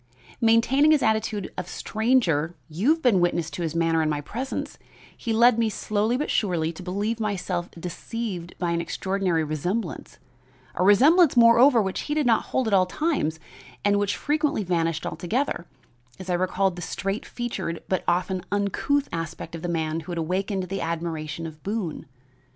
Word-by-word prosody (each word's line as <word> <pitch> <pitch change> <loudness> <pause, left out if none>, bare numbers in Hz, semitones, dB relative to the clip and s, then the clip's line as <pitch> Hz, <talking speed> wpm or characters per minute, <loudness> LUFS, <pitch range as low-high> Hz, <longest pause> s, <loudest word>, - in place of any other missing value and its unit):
Maintaining 230 +6 +4
his 310 -2 +4
attitude 220 -2 0
of 180 - -5
stranger 185 - +1
you 175 - 0
have 325 +1 +2
been 230 -7 +4
witness 170 -2 0
to - - -5
his 165 -1 -2
manner 165 -1 +2
in 155 - +1
my 150 -1 -1
presence 245 - -5 0.4
he 230 - -4
led 235 +1 +5
me 225 -1 +2
slowly 215 +3 0
but 295 - -2
surely 170 -6 0
to 170 - -10
believe 205 +5 -2
myself 185 -4 -2
deceived 180 0 -5
by 175 -2 -1
an 170 0 0
extraordinary 190 -2 -1
resemblance; 165 +9 -3 0.6
a - - 0
resemblance, 275 - +6
moreover, 235 +1 +7
which 190 -1 -3
did 300 -1 0
not 230 -3 +3
hold 260 -3 -1
at 215 - 0
all 185 -2 +4
times, 180 - -1 0.5
and 205 0 +3
which 205 0 0
frequently 300 -5 0
vanished 165 -3 -1
altogether, 180 - -2 0.5
as 185 -1 -5
I - - +2
recalled 185 +1 0
the - - -6
straight 195 +4 -3
featured 240 -8 -4
but 185 - 0
often 180 +1 0
uncouth 205 +8 0
aspect 165 0 -5
of 165 - -6
the 175 - -3
man 160 -1 -1
who 165 +2 -8
had 170 - -4
awakened 190 +4 -1
the 195 +2 -4
admiration 165 -1 -3
of 155 -1 -9
Boone. 195 -7 -4
190 Hz, 170 wpm, -25 LUFS, 170-230 Hz, 0.6 s, moreover